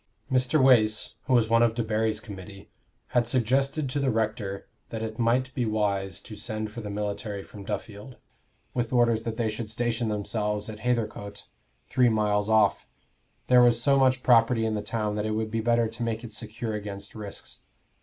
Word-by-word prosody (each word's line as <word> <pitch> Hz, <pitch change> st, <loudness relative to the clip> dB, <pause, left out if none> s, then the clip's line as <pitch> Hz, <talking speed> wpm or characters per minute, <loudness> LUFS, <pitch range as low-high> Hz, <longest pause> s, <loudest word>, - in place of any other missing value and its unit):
Mr. 130 Hz, +4 st, +2 dB
Wace, 110 Hz, -5 st, +4 dB
who 130 Hz, -, +2 dB
was 120 Hz, -3 st, +4 dB
one 115 Hz, +1 st, +4 dB
of 115 Hz, -1 st, +3 dB
Debarry's 110 Hz, -1 st, 0 dB
committee, 100 Hz, -2 st, -11 dB, 0.4 s
had 120 Hz, -1 st, +2 dB
suggested 135 Hz, +4 st, +1 dB
to 135 Hz, +3 st, -2 dB
the 135 Hz, -1 st, +1 dB
rector 110 Hz, -3 st, -2 dB, 0.2 s
that 110 Hz, -1 st, -4 dB
it 110 Hz, +1 st, -5 dB
might 125 Hz, +3 st, +1 dB
be 125 Hz, -, -1 dB
wise 100 Hz, -4 st, -1 dB
to 110 Hz, -, -10 dB
send 110 Hz, 0 st, -4 dB
for 115 Hz, +1 st, -7 dB
the 105 Hz, -, -6 dB
military 105 Hz, 0 st, -4 dB
from 100 Hz, -, -11 dB
Duffield, 105 Hz, +4 st, -6 dB, 0.6 s
with 120 Hz, -2 st, -1 dB
orders 120 Hz, -3 st, +3 dB
that 115 Hz, -1 st, -3 dB
they 115 Hz, -3 st, 0 dB
should 110 Hz, 0 st, -5 dB
station 120 Hz, +1 st, -1 dB
themselves 105 Hz, 0 st, -2 dB
at 105 Hz, -, -10 dB
Hathercote, 105 Hz, -3 st, -2 dB, 0.4 s
three 125 Hz, -2 st, +3 dB
miles 105 Hz, -1 st, +1 dB
off: 110 Hz, -2 st, +3 dB, 0.6 s
there 125 Hz, -1 st, +6 dB
was 120 Hz, -1 st, +5 dB
so 140 Hz, +3 st, +4 dB
much 130 Hz, -1 st, +3 dB
property 115 Hz, -1 st, +4 dB
in 110 Hz, -, 0 dB
the 105 Hz, -, -1 dB
town 105 Hz, -1 st, -2 dB
that 105 Hz, 0 st, -2 dB
it 110 Hz, -, -1 dB
would 110 Hz, 0 st, -2 dB
be 115 Hz, 0 st, -1 dB
better 115 Hz, 0 st, +2 dB
to 115 Hz, +2 st, -10 dB
make 115 Hz, -1 st, -2 dB
it 115 Hz, -2 st, -8 dB
secure 110 Hz, +1 st, -4 dB
against 100 Hz, -1 st, -6 dB
risks. 105 Hz, -3 st, -8 dB
110 Hz, 185 wpm, -27 LUFS, 105-120 Hz, 0.6 s, there